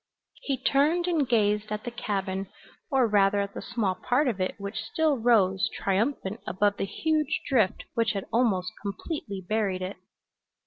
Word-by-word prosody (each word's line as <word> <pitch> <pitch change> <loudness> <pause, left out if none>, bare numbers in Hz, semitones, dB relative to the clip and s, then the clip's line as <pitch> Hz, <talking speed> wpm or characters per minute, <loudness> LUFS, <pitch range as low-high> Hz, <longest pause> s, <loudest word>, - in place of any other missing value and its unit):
He 275 -2 -1
turned 295 +7 +2
and 320 -8 +1
gazed 210 -2 +2
at 210 0 -3
the 240 - -4
cabin, 195 -4 -3 0.4
or 265 -5 +3
rather 200 -1 +3
at 200 0 -4
the - - -6
small 210 -6 -1
part 255 +9 +1
of 210 -6 -1
it 185 - -1
which 200 +2 -5
still 295 +4 +1
rose 200 -5 +3
triumphant 205 +1 -1
above 205 +3 +1
the - - -1
huge 310 +7 0
drift 225 -9 +2
which 230 -1 +1
had 195 -2 -3
almost 210 -7 +2
completely 200 - -5
buried 200 -4 0
it. 185 +2 -5
215 Hz, 165 wpm, -27 LUFS, 195-255 Hz, 0.4 s, or